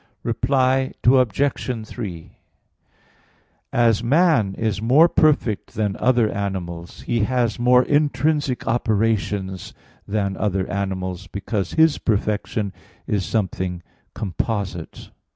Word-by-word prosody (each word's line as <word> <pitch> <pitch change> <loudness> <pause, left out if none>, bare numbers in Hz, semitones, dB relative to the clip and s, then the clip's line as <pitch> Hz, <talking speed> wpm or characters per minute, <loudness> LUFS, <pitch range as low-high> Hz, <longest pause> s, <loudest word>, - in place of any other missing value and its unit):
Reply 130 +2 +1
Obj. 125 -1 +2
3: 85 -8 -7 1.4
As 115 -2 +2
man 135 - +3
is 110 -2 -2
more 135 +9 +6
perfect 150 - +1
than 105 -2 -1
other 125 -3 +3
animals, 90 -4 -5
he 120 - -1
has 125 0 0
more 125 +1 +5
intrinsic 145 -1 +1
operations 105 -5 -1 0.3
than 100 -2 -1
other 95 -3 -1
animals, 95 -1 -3
because 100 -1 -3
his 160 -2 +4
perfection 105 -1 -1 0.3
is 100 -2 -1
something 95 -4 -2 0.3
composite. 95 -2 -4
110 Hz, 100 wpm, -22 LUFS, 95-125 Hz, 1.4 s, more